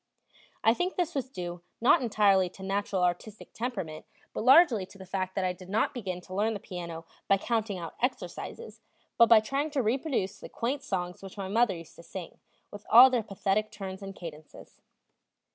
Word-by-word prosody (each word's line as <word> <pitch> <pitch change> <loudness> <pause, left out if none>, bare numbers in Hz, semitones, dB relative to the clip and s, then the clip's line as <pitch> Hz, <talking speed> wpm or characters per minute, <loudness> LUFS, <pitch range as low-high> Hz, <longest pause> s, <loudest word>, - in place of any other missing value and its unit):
I 225 - +6
think 355 +8 -2
this 350 -2 -1
was 265 -2 -2
due 175 -6 -6 0.2
not 240 +3 +5
entirely 200 -5 +3
to 190 - -12
natural 195 -1 -1
artistic 180 +5 -3
temperament, 195 -11 -5 0.3
but - - -3
largely 260 - +6
to 195 - -16
the 190 - -10
fact 185 0 -3
that 195 - 0
I 180 - 0
did 180 0 -13
not 210 +3 +1
begin 185 -7 -4
to 185 - -11
learn 215 +3 +1
the - - -4
piano 170 -5 -7 0.2
by 195 - +5
counting 220 -1 -1
out 170 -2 -6
exercises, 260 - -4 0.4
but 235 - +7
by 225 -2 +8
trying 275 +7 -1
to 285 -4 0
reproduce 225 -4 -1
the - - -10
quaint 260 +4 -2
songs 180 -8 -3
which 195 +1 -10
my 195 -1 -4
mother 230 0 +3
used 165 -1 -11
to - - -11
sing, 175 0 -9 0.3
with 205 0 -9
all 255 +3 +9
their 245 -2 +2
pathetic 205 0 -1
turns 195 -2 -7
and 195 0 -7
cadences. 155 -3 -11
200 Hz, 195 wpm, -29 LUFS, 185-235 Hz, 0.4 s, all